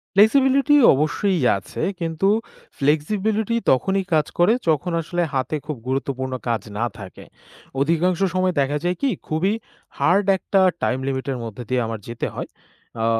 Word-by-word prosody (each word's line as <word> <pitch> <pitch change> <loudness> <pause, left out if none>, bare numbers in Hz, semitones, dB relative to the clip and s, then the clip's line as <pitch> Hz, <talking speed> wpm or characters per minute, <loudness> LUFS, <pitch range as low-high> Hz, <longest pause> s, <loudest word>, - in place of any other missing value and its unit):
Flexibility 270 +7 +5 0.2
অবশ্যই 165 +7 0 0.2
আছে, 95 - -7 0.2
কিন্তু 165 +2 -1 0.5
ফ্লেক্সিবিলিটি 205 +10 0 0.2
তখনই 190 +9 +1
কাজ 155 -1 +3
করে 175 +6 +5
যখন 160 +3 +1
আসলে 175 +2 -2
হাতে 135 +3 -1
খুব 150 -3 -4
গুরুত্বপূর্ণ 130 0 -2 0.2
কাজ 115 -1 0 0.2
না 115 - 0
থাকে। 95 -2 -10 0.6
অধিকাংশ 170 +4 +1 0.2
সময় 185 0 +1
দেখা 140 +2 0
যায় 175 +1 0
কি 280 - +2 0.2
খুবই 170 +6 0 0.5
হার্ড 190 +4 +3
একটা 195 +1 +1 0.2
টাইম 130 - +1
লিমিট 135 0 -2
এর 130 - -3
মধ্য 115 -3 -7
দিয়ে 125 -1 +1
আমার 110 -1 -4
যেতে 115 0 -3
হয়। - - -5 0.5
আ - - +2
160 Hz, 150 wpm, -22 LUFS, 135-195 Hz, 0.6 s, ফ্লেক্সিবিলিটি